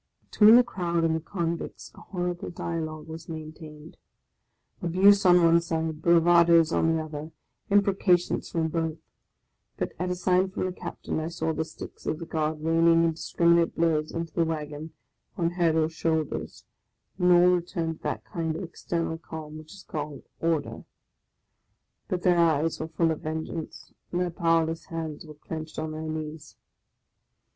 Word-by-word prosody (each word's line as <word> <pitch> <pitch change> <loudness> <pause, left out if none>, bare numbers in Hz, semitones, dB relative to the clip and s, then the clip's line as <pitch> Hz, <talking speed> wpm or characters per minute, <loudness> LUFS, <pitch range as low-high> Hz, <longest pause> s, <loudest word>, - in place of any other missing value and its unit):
Between 215 +1 +8
the 245 - +8
crowd 175 -7 -1
and 160 -1 +2
the - - -1
convicts 170 0 -4
a - - -14
horrible 180 -2 -4
dialogue 160 -2 -5
was 160 +1 -9
maintained, 155 -1 -9 0.4
— - - -45
abuse 190 +3 +5
on 180 -1 +6
one 170 0 +5
side, 160 -2 -3
bravadoes 170 -1 +5
on 165 - +2
the 160 - -1
other, 155 0 -7 0.4
imprecations 195 -3 +2
from 160 -1 -1
both; 160 -1 -2 0.8
but - - -2
at 180 +1 -1
a 180 - -1
sign 185 +1 +2
from 190 - -3
the 185 - -2
Captain 180 - -5
I 155 - -3
saw 165 -1 -2
the 160 - -1
sticks 160 - -10
of 155 - 0
the 165 - -7
Guard 155 -1 -2
raining 165 +1 +4
indiscriminate 170 +1 +2
blows 160 -2 +1
into 165 -1 -4
the 170 - +2
wagon, 155 -1 -4 0.5
on 170 -2 +1
heads 170 -2 +2
or 155 -1 +3
shoulders, 160 -2 -2 0.5
and 180 0 +4
all 175 0 +7
returned 165 -2 -3
to - - -32
that - - -3
kind 165 -2 -3
of 175 - -4
external 165 -1 -3
calm 155 -2 -8
which 155 0 -13
is 195 - -13
called 150 -2 -6
" - - -46
order." 165 -3 -1 1.2
But 180 -1 -3
their 180 -2 +4
eyes 160 -1 +2
were 160 - -3
full 165 0 +1
of 160 - -4
vengeance, 160 +1 -6 0.2
and 175 - -1
their 180 -1 -1
powerless 165 -2 +1
hands 160 -1 -6
were 150 - -11
clenched 155 +1 -7
on 155 0 -3
their 155 0 -5
knees. 155 -1 -6
165 Hz, 170 wpm, -27 LUFS, 160-170 Hz, 1.2 s, Between